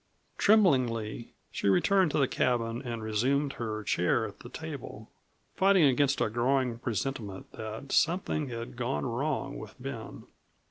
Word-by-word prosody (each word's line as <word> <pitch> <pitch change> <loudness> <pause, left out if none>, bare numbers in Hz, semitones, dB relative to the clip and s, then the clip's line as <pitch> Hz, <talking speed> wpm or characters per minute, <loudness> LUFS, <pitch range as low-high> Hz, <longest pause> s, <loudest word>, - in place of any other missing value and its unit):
Tremblingly 130 - +2 0.2
she 100 - 0
returned 185 - +4
to - - -1
the 140 -3 +3
cabin 120 -1 0
and 120 -4 -5
resumed 135 +7 +1
her 110 -2 -4
chair 90 -3 +1
at - - -9
the - - -10
table, - - -8 0.4
fighting 195 -2 +4
against 135 -1 +3
a - - +3
growing 125 0 +1
presentiment 110 -4 -4
that 110 +5 -7
something 165 -4 +1
had 120 +1 -6
gone 125 +3 -2
wrong 140 +3 -2
with 110 -3 -10
Ben. 125 -3 -7
125 Hz, 140 wpm, -29 LUFS, 115-140 Hz, 0.4 s, returned